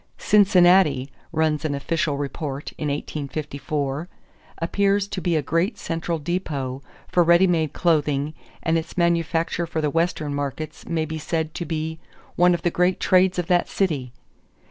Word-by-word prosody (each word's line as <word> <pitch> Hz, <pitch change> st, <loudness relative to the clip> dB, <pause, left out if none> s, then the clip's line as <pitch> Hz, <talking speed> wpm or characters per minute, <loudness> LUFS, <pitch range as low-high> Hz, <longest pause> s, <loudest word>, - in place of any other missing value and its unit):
"Cincinnati," 180 Hz, -9 st, +4 dB, 0.2 s
runs 155 Hz, -2 st, +1 dB
an 150 Hz, -2 st, -1 dB
official 145 Hz, +1 st, -1 dB
report 140 Hz, 0 st, -4 dB
in 150 Hz, -, -3 dB
1854, 145 Hz, +1 st, -3 dB, 0.5 s
"appears 200 Hz, +3 st, +1 dB
to 190 Hz, -, -4 dB
be 170 Hz, 0 st, +1 dB
a 155 Hz, -, +1 dB
great 165 Hz, -, 0 dB
central 165 Hz, 0 st, -2 dB
depot 145 Hz, -5 st, -3 dB, 0.3 s
for 175 Hz, -, +2 dB
ready 170 Hz, +2 st, +6 dB
made 160 Hz, -5 st, +1 dB
clothing 150 Hz, -3 st, +1 dB, 0.3 s
and 165 Hz, 0 st, +2 dB
its 165 Hz, +2 st, -9 dB
manufacture 170 Hz, 0 st, +1 dB
for 165 Hz, -, -3 dB
the 150 Hz, -2 st, 0 dB
Western 165 Hz, -3 st, 0 dB
markets 145 Hz, +2 st, -5 dB
may 160 Hz, -2 st, 0 dB
be 160 Hz, 0 st, -5 dB
said 160 Hz, 0 st, -2 dB
to 175 Hz, -, -4 dB
be 160 Hz, 0 st, -3 dB, 0.4 s
one 180 Hz, 0 st, +5 dB
of 170 Hz, -, -6 dB
the 175 Hz, -, +2 dB
great 180 Hz, +2 st, +2 dB
trades 185 Hz, 0 st, +3 dB
of 175 Hz, -, 0 dB
that 175 Hz, 0 st, +2 dB
city." 145 Hz, -10 st, -1 dB
160 Hz, 155 wpm, -23 LUFS, 145-175 Hz, 0.5 s, ready